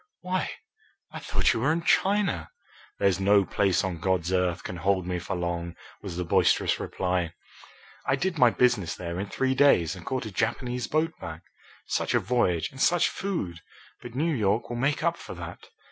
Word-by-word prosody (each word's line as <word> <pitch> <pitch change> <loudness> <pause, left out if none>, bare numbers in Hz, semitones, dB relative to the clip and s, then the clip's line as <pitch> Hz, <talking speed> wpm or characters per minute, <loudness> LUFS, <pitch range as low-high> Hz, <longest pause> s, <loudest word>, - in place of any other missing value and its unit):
Why, 185 +1 -1 0.6
I - - -6
thought - - +1
you - - -2
were 140 +7 +2
in 165 +1 -1
China." 195 - +2 0.5
"There's 100 -2 +2
no 100 0 +4
place 95 -2 +1
on 90 -3 -3
God's 95 0 0
earth 90 -1 +1
can 90 - -5
hold 95 +1 +1
me 90 -1 -2
for 90 - -4
long," 85 -1 -3 0.3
was 95 -4 -6
the 90 - -1
boisterous 85 - +2
reply. 90 -3 -2 0.7
"I 135 - +3
did 170 +3 -2
my 125 - +7
business 120 -8 +2
there 85 0 -5
in 100 - -3
three 130 +4 0
days 130 - +4
and 90 - -10
caught 130 +2 -3
a 110 - -6
Japanese 125 +4 -1
boat 160 +2 +1
back. 80 +1 -7 0.4
Such - - 0
a - - +5
voyage 95 -10 +1
and 135 - -8
such 175 -1 +4
food! 165 - -3 0.4
But 120 -1 -9
New 160 +4 +1
York 110 -1 0
will 120 - -3
make 140 +5 0
up 170 0 +1
for - - -9
that. - - -9
100 Hz, 190 wpm, -27 LUFS, 90-135 Hz, 0.7 s, my